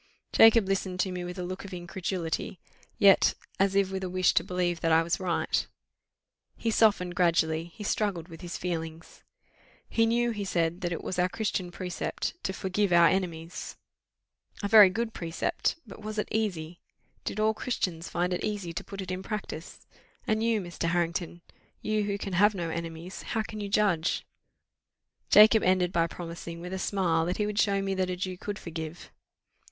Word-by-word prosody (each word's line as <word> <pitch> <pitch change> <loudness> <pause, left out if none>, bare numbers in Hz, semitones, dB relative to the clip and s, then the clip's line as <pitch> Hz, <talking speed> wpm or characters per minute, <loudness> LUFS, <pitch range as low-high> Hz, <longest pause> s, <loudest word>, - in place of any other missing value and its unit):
Jacob 225 -2 +7
listened 190 -1 -1
to 190 +1 +1
me 180 -1 -4
with 180 +1 -6
a 180 - -3
look 185 +1 -5
of 195 -2 -7
incredulity, 175 0 -3 0.4
yet 195 -1 +6 0.2
as 195 0 +2
if 195 -1 +2
with 190 0 -3
a 185 - -2
wish 185 0 +3
to - - +3
believe 175 -1 -1
that 165 - +1
I 160 +1 +5
was 170 +1 -1
right: 180 -3 0 0.9
he 230 - -1
softened 200 -5 +3
gradually 165 -2 +2
he 210 +5 -10
struggled 200 -5 -1
with 165 -1 -11
his 175 -1 -5
feelings. 165 -2 -5 0.7
"He 225 0 +2
knew," 240 +1 +2
he 210 -3 -3
said, 170 -2 0
"that 175 -1 -2
it 165 - -4
was 185 - -3
our 180 +1 +3
Christian 200 -4 -2
precept 180 +1 -3
to - - -2
forgive 190 +1 -1
our 170 -1 +7
enemies 170 -2 -3 0.9
a - - +1
very 205 -2 +9
good 225 +3 -2
precept: 165 -1 -1
but 215 -1 -11
was 215 0 -6
it 210 - -1
easy? 180 -6 -2 0.4
Did 215 - -4
all 215 +1 +3
Christians 180 -8 -3
find 180 +1 0
it 180 - -2
easy 200 -5 -3
to - - -4
put 200 -1 -7
it 185 - -6
in 185 0 -3
practice? 190 -5 -6 0.4
And 215 0 +1
you, 230 -2 +2
Mr. 175 -2 -3
Harrington, 170 0 -1 0.4
you 215 -1 0
who 200 -1 -1
can 195 -1 -5
have 205 +4 +4
no 170 -3 -3
enemies, 165 +2 -6
how 220 -2 -2
can 215 0 -7
you 200 - -4
judge?" 195 -6 +1 1.0
Jacob 215 +1 +8
ended 180 -1 +2
by 165 -1 +2
promising, 170 0 -7
with 180 +2 -6
a 190 - -3
smile, 175 -4 +1
that 180 - -1
he 210 - +1
would 210 0 -2
show 200 -2 +2
me 195 0 -1
that 185 -1 0
a 180 - -1
Jew 185 0 -3
could 205 +3 -5
forgive. 165 -1 -7
185 Hz, 190 wpm, -28 LUFS, 170-205 Hz, 1.0 s, very